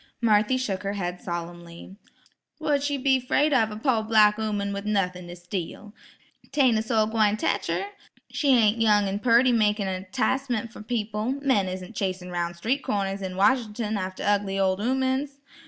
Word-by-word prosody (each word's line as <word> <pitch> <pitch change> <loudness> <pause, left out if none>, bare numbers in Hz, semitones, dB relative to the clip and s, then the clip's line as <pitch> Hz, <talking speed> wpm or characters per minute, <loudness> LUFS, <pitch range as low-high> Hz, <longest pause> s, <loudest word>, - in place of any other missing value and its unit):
Marthy 220 +2 +3
shook 205 -8 -2
her 200 0 -3
head 180 -3 -4
solemnly. 170 +1 -7 0.6
"Wha'd 295 -2 +1
she 285 0 -1
be 265 0 +2
'fraid 285 +4 +1
of 225 -5 +3
a 210 - -7
po' 230 -1 +1
black 215 -1 +4
'ooman 205 -2 -2
with 200 0 -4
nuthin' 180 -4 -1
to 175 - -8
steal? 180 +3 -6 0.6
'Tain't 260 -6 +3
a - - 0
soul 220 -1 +1
gwine 215 -1 +1
tech 320 - -1
her. - - -1 0.5
She 295 - -2
ain't 220 0 +3
young 210 -2 +4
an' 195 +1 -2
purty 245 +2 +4
makin' 210 -3 +1
a 185 0 -3
'ticemen' 245 +2 -1
fer 220 - -12
people; 215 +1 -2
men 215 -9 +2
isn't 185 +3 -7
chasin 185 -2 -3
'roun' 175 -1 -2
street 240 +11 -1
corners 195 -1 -2
in 190 -1 -4
Wash'nt'n 220 0 +1
after 185 -2 -4
ugly 200 -1 0
ol' 190 0 +1
'oomen's. 265 +3 -1
210 Hz, 175 wpm, -25 LUFS, 195-240 Hz, 0.6 s, black